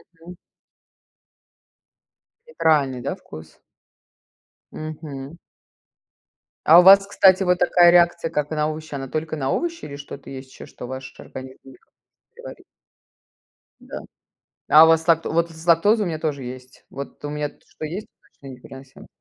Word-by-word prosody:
Мгм. 170 +2 -13 2.1
Неправильный, 145 - +1
да, - - -4
вкус? 80 0 -14 1.1
Мгм. 155 -1 -8 1.3
А 165 +3 +8
у - - +6
вас, 195 +1 +8
кстати, 190 -1 +4
вот 180 -1 +1
такая 175 -1 +5
реакция, 170 -1 +3
как 150 0 -2
на 155 -1 -1
овощи. 155 -1 -8
Она 135 -1 -5
только 155 +3 -4
на 135 -3 -2
овощи 335 -1 -3
или 140 - -8
что-то 140 0 -10
есть 130 -1 -10
ещё, - - -12
что 125 - -10
ваш 130 0 -9
организм 130 0 -10
никак 135 - -18
не - - -63
переварит? - - -12 1.2
Да. - - -9 0.7
А 155 +2 +8
у - - +5
вас 165 0 +2
лакто 165 -1 +2
вот 170 +1 0
из-за 160 +1 -12
лактозы 205 +7 +3
у 200 - -1
меня 160 -2 -3
тоже 145 -3 -3
есть. 125 +1 -11
Вот 140 +2 -9
у 145 - -4
меня 150 0 -3
то, - - -28
что - - -10
есть 180 +7 -6 0.3
точно, 140 - -17
непереносимо 130 +1 -14
155 Hz, 155 wpm, -22 LUFS, 135-170 Hz, 2.1 s, А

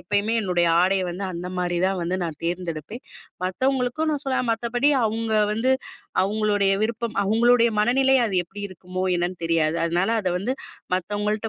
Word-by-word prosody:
எப்பயுமே 205 +4 0
என்னுடைய 180 -4 +1 0.2
ஆடைய 190 +1 +2
வந்து 190 +3 -5
அந்த 175 +1 -5
மாரிதான் 180 +1 0
வந்து 175 +2 -1
நான் 160 -3 -4
தேர்ந்தெடுப்பேன். 175 - -4 0.4
மத்தவங்களுக்கும் 260 +8 0
நான் 295 -1 -2
சொல்வேன் 260 -2 0
மத்தபடி 235 +4 +1 0.2
அவுங்க 220 0 -1 0.2
வந்து 230 +5 +1 0.5
அவுங்களுடைய 205 -1 +1
விருப்பம், 230 0 -2
அவங்களுடைய 235 +3 +4
மனநிலை 260 +5 +3
அது 200 - -3
எப்படி 200 +4 -10
இருக்குமோ 185 0 -6
என்னன்னு 175 +1 -1
தெரியாது. 165 -1 +1
அதனால, 175 +4 +1
அத 185 - -1
வந்து 215 +8 -1 0.4
மத்தவங்கள்ட்ட 210 +3 -2
205 Hz, 145 wpm, -24 LUFS, 180-235 Hz, 0.5 s, அவங்களுடைய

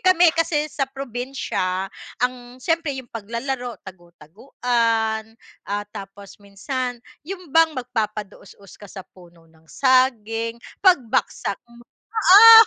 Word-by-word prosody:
kami 355 -2 +5
kasi 330 -2 +1
sa 275 -2 -1
probinsya 245 -8 -3 0.2
ang 250 0 -3
siyempre 320 0 -1
yung 255 -3 -9
paglalaro 235 +3 -4
tagu-taguan, 220 - -2 0.3
ah, 205 +1 -2
tapos 200 +1 -10
minsan, 245 +5 -4 0.3
yung 365 -6 -7
bang 325 -2 +4
magpapadaosdos 210 -5 -5
ka 205 - -11
sa 190 -1 -9
puno 175 -2 -19
ng 160 -1 -26
saging, 230 -4 +2 0.2
pagbagsak 265 - +2
mo, 235 0 -17 0.3
ah! 450 +2 +10
240 Hz, 110 wpm, -22 LUFS, 205-275 Hz, 0.3 s, ah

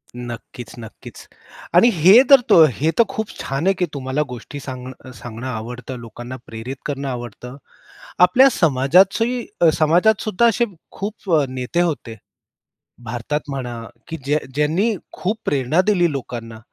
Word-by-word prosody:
नक्कीच, 120 -1 -8
नक्कीच 110 -1 -12 0.5
आणि 205 +8 +7
हे 185 +8 +7
तर 275 -1 +9
तो 170 -6 +8
हे 155 +6 0
तर - - +8
खूप 220 -1 -4
छान 135 +6 -2
आहे, 195 - +4
की 180 -1 -1
तुम्हाला 135 +1 -2
गोष्टी 125 +4 -8
सांग 130 -2 -7 0.3
सांगणं 115 +3 -8
आवडतं, 125 +2 -6
लोकांना 120 +2 -9
प्रेरित 115 +4 -7
करणं 140 -1 -3
आवडतं. 125 +1 -7 0.6
आपल्या 180 +10 +6
समाजाची 190 - +2 0.3
समाजात 175 +7 +3
सुद्धा 215 +2 +2
असे 235 +1 +3 0.3
खूप 200 -1 -6
अ, 150 -2 +4
नेते 130 +6 -2
होते. 145 -9 -3 0.9
भारतात 120 +6 -3
म्हणा, 125 -4 -5 0.3
की 165 - -4
ज्यां 145 +2 +1 0.2
ज्यांनी 165 +10 +1 0.2
खूप 205 +5 -2
प्रेरणा 140 +4 +1
दिली 180 -5 +3
लोकांना. 120 -4 -6
140 Hz, 140 wpm, -20 LUFS, 125-180 Hz, 0.9 s, तर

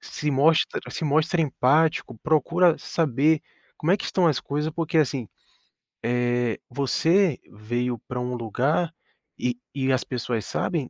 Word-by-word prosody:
se 150 -1 -4
mostra 150 +4 +3
se - - -6
mostra 155 +4 +2
empático, 145 -2 +2
procura 170 +2 +3
saber 155 0 +1 0.4
como 160 - 0
é 190 - +5
que - - -7
estão 180 -2 +1
as 145 -6 +1
coisas, 150 +4 -2
porque 165 0 -2
assim, 135 -5 +1 0.9
eh, 120 -1 0
você 160 +6 +2
veio 120 +3 -2
pra 125 - -4
um 125 0 -3
lugar 140 +9 0 0.4
e 125 -1 -1 0.2
e 135 -1 0
as 130 - +1
pessoas 120 -3 -3
sabem, 155 -8 -2
140 Hz, 145 wpm, -25 LUFS, 125-160 Hz, 0.9 s, é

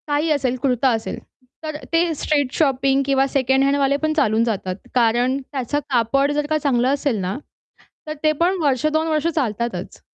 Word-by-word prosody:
काही 295 +2 0
असेल, 265 -4 +1
कुर्ता 260 -1 +2
असेल. 220 - -5 0.4
तर 310 -1 -4 0.2
ते 330 0 +2
स्ट्रीट 285 -3 0
शॉपिंग 275 -2 +2
किंवा 270 0 +2
सेकंड 265 0 +1
हँडवाले 280 0 +2
पण 310 - +1
चालून 225 -6 +3
जातात 195 -5 -2 0.2
कारण 245 +2 +2
त्याचं 275 +1 -2
कापड 275 +3 +2
जर 295 0 -1
का 310 - +2
चांगलं 255 -3 +2
असेल 280 -4 -1
ना, 185 +4 -3 0.7
तर 305 - -4
ते 310 - +4
पण 360 +3 +2
वर्ष 275 -2 +1
2 315 +1 +1
वर्ष 310 0 0
चालतातच. 225 - -3
275 Hz, 170 wpm, -21 LUFS, 240-295 Hz, 0.7 s, ते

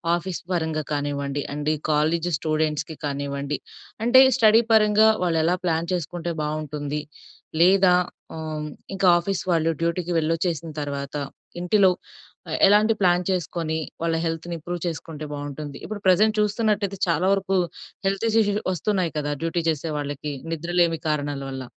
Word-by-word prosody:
Office 175 +1 -4
పరంగా 160 -3 -1
కానివ్వండి, 145 -1 -2
అంటే 150 +1 -1 0.2
కాలేజ్ 160 +3 +1
స్టూడెంట్స్‌కి 155 0 -1
కానివ్వండి, 140 0 -3 0.5
అంటే 240 +3 +7 0.2
స్టడీ 225 -2 +6
పరంగా 215 0 +5 0.2
వాళ్ళు 170 -2 +1
ఎలా 175 +3 +3
ప్లాన్ 165 -1 0
చేసుకుంటే 175 0 -3
బావుంటుంది? 150 -1 -3 0.6
లేదా 185 +1 +6 0.4
హ్మ్, 155 -1 -4 0.3
ఇంకా 195 -1 +2
ఆఫీస్ 190 +2 -2
వాళ్ళు 165 -1 +2
డ్యూటీకి 170 +1 -1
వెళ్ళొచ్చేసిన 165 0 -1
తర్వాత 140 -1 -4 0.5
ఇంటిలో 190 +1 +4 0.8
ఎలాంటి 210 +3 +5
ప్లాన్ 180 -1 +3
చేసుకొని 165 -3 -2 0.2
వాళ్ళ 165 -1 +1
హెల్త్‌ని 165 +1 -3
ఇంప్రూవ్ 175 +2 -5
చేసుకుంటే 155 -2 -5
బావుంటుంది? 145 0 -6
ఇప్పుడు 215 -1 -6
ప్రెజెంట్ 215 +4 +4
చూస్తున్నట్టయితే 210 -2 0
చాలా 170 +2 +2
వరకు 195 -1 0 0.5
హెల్త్ 195 +3 0
ఇష్యూస్ 220 -2 +3 0.2
వస్తున్నాయి 185 0 -1
కదా, 145 0 -2
డ్యూటీ 165 +1 -1
చేసే 160 0 -2
వాళ్ళకి 145 0 -4 0.2
నిద్రలేమి 170 0 +1
కారణాల 145 -2 -1
వల్ల. 130 -1 -5
165 Hz, 130 wpm, -24 LUFS, 150-185 Hz, 0.8 s, అంటే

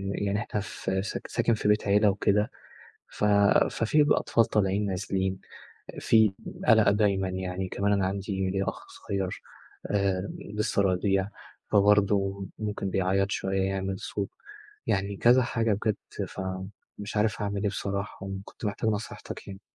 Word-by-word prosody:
يعني 100 0 0
إحنا 105 0 -3
ف 100 - -6
س 100 - -4
ساكن 115 - +1
في 110 - -1
بيت 105 0 +2
عِيلة 105 +1 +5
وكده 105 +1 +1 0.6
ف - - -6 0.5
ففي 150 +7 +3
بقى 145 - +3
أطفال 115 - +2
طالعين 100 -1 +1
نازلين، 95 -1 -1 0.6
في 110 -3 +4 0.3
قلق 110 -3 +6
دايمًا 100 -2 +2
يعني، 95 0 -3
كمان 100 +2 0
أنا 100 -2 +2
عندي 95 0 -2
ليّا 95 +1 0
أخ - - -6
صغيّر 95 -2 -4 0.5
آآ، 100 -1 +1 0.3
لسه 105 -1 +1
رضيع 95 +1 +1 0.4
فبرضو 100 -1 +3
ممكن 105 -2 -3
بيعيّط 95 +1 +1
شوية، 95 0 0
يعمل 95 0 -2
صوت 100 -2 -3 0.6
يعني 100 +1 0
كذا 125 +5 +5
حاجة 115 -2 0
بجد 105 +1 -3
فمش 95 +2 -7
عارف 110 +1 +1
أعمل 100 -1 -2
إيه 105 - +2
بصراحة 100 0 -4
وكنت 95 +3 -8
محتاج 105 +1 0
نصيحتك 105 0 -5
يعني. 95 0 -8
100 Hz, 145 wpm, -28 LUFS, 95-105 Hz, 0.6 s, قلق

